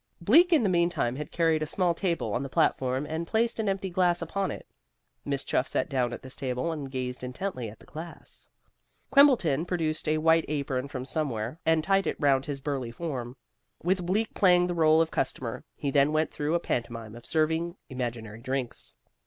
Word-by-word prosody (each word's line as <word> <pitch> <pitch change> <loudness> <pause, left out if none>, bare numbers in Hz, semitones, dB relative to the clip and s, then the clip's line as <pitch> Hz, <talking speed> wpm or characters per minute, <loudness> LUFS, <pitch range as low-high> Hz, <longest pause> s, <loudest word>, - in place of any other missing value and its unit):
Bleak 315 - +5
in 315 -8 +5
the - - +3
meantime 170 -9 +1
had 150 0 -6
carried 165 -2 +2
a 155 - -1
small 180 +1 +1
table 170 - -1
on 120 - 0
the 135 - -4
platform, 130 +1 +1
and 160 +2 -4
placed 230 +3 +1
an 215 -2 +1
empty 195 -1 -2
glass 175 -1 +2
upon 190 +4 -2
it. - - -6 0.6
Miss 140 -1 -1
Chuff 130 - 0
sat - - -1
down 125 -4 0
at - - -7
this 130 0 -9
table, 130 +4 -2
and 145 -4 -5
gazed 125 -1 -4
intently 125 - -4
at 105 - -12
the - - -18
glass. 165 +2 -9 0.6
Quimbleton 235 - +5
produced 165 -4 -2
a 155 - +2
white 160 +1 +4
apron 140 -3 -2
from 130 -2 -5
somewhere, 130 -3 -3
and 160 -1 +4
tied 195 +2 +2
it - - -2
round 135 -2 +3
his 140 -2 -4
burly 135 -4 -2
form. 125 -3 -5 0.5
With 180 +1 +1
Bleak 215 +4 0
playing 180 -2 +5
the 180 - -1
role 160 -1 +5
of 160 - -7
customer 125 -3 -2
he 140 - -2
then 140 +1 +4
went 155 +1 +1
through 150 +3 -1
a - - +3
pantomime 115 -7 -3
of 120 0 -12
serving 160 +2 0
imaginary 115 -4 -5
drinks. 130 -1 -4
155 Hz, 195 wpm, -28 LUFS, 130-175 Hz, 0.6 s, Bleak